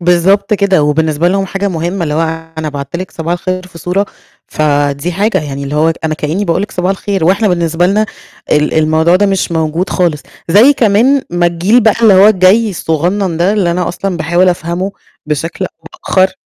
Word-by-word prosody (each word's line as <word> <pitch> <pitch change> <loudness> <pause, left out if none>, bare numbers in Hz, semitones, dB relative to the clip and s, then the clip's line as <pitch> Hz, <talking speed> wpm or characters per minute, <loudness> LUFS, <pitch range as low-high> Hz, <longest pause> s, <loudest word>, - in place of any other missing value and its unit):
بالضبط 190 +4 +2
كده، 195 -5 +2
وبالنسبة 155 +2 +1
لهم 195 +1 0
حاجة 195 +2 -2
مهمّة 175 +1 -3
اللي 150 -2 -2
هو 160 - 0 0.4
أنا 155 -1 -3
بعَتّ 140 +1 -5
لِك 185 +1 -6
صباح 165 +1 -4
الخير 185 +1 -4
في 170 -2 -13
صورة، 190 +4 -1 0.4
فدي 145 +2 -1
حاجة 200 +2 0
يعني 140 -1 -5
اللي 140 - -5
هو 160 +2 +2
أنا 155 -1 0
كإني 155 +7 -2
باقول 180 +1 0
لِك 210 - -5
صباح 180 +1 -1
الخير، 195 -2 -2
وإحنا 195 +5 +2
بالنسبة 170 -1 +1
لنا 210 +3 +1 0.5
ال 150 0 +1
الموضوع 160 +2 +3
ده 205 +2 +2
مش 195 -3 -1
موجود 160 +2 -1
خالص، 170 -6 0 0.3
زي 215 +11 +6
كمان 250 +3 +2
ما 175 0 +1
الجيل 175 +8 +2
بقى 220 -1 +3
اللي 215 -4 +6
هو 190 +2 +6
الجاي 210 +2 +3
الصغنن 175 +2 -1
ده 175 +4 +1
اللي 195 -5 +1
أنا 180 0 -1
أصلًا 190 +1 -3
باحاول 175 +3 +1
أفهمه 175 +3 -2 0.3
بشكل 155 +2 -3
أو - - -8 0.3
بآخر 190 0 +2
175 Hz, 195 wpm, -12 LUFS, 160-195 Hz, 0.5 s, زي